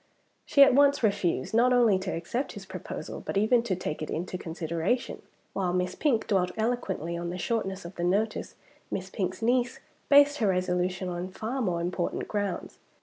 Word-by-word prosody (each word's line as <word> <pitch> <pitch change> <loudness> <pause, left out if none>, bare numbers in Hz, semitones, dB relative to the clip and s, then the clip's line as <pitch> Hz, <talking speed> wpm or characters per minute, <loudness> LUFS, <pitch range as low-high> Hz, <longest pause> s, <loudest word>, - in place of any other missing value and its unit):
She 280 - +7
at 275 - +6
once 280 0 +4
refused, 200 -4 0
not 240 +3 +4
only 235 -6 +4
to 190 0 -4
accept 215 +11 -3
his - - -9
proposal, - - -7
but - - -3
even 220 +4 +4
to 220 -5 -1
take 155 -4 -4
it 155 - -4
into 180 +3 -3
consideration. 170 +6 -2 0.3
While 180 -2 -1
Miss 180 0 0
Pink 250 -8 +1
dwelt 185 -3 +1
eloquently 220 -7 -1
on 170 0 -3
the 180 - -4
shortness 195 -1 -2
of 170 - -8
the 175 - -2
notice, 205 +5 0 0.3
Miss 190 0 -4
Pink's 185 +2 -3
niece 245 +1 +1 0.3
based 285 +1 +6
her 220 - +2
resolution 180 0 0
on 180 +1 -4
far 225 +7 -4
more 175 -6 0
important 175 0 -2
grounds. 205 -2 -3
190 Hz, 180 wpm, -28 LUFS, 180-235 Hz, 0.3 s, She